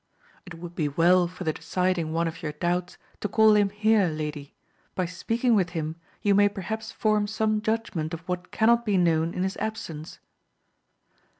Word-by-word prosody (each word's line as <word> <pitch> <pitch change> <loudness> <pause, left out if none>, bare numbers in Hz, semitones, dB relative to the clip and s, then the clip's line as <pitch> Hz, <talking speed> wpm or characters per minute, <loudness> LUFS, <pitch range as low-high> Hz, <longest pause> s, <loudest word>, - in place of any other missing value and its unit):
It 175 - -8
would 170 +1 -9
be 155 -4 -1
well 175 +4 +4
for 180 +1 -8
the 160 -2 0
deciding 170 0 -1
one 165 +1 0
of 165 +1 -6
your 155 -3 -4
doubts, 175 +3 -2 0.2
to - - -2
call 220 +1 +5
him 205 -1 +4
here, 210 -1 +3
lady; 150 -2 -5 0.4
by 185 - 0
speaking 230 +7 0
with 190 -5 +3
him 160 0 -3 0.3
you 205 - +4
may 205 +1 +5
perhaps 220 +3 -5
form 215 -1 +1
some 215 0 0
judgment 220 -8 -2
of 165 -1 -5
what 180 0 -3
cannot 235 +2 +3
be 205 -4 +1
known 165 -2 +2
in 180 - -1
his 190 0 -2
absence. 190 -8 -5
180 Hz, 180 wpm, -26 LUFS, 165-215 Hz, 0.4 s, call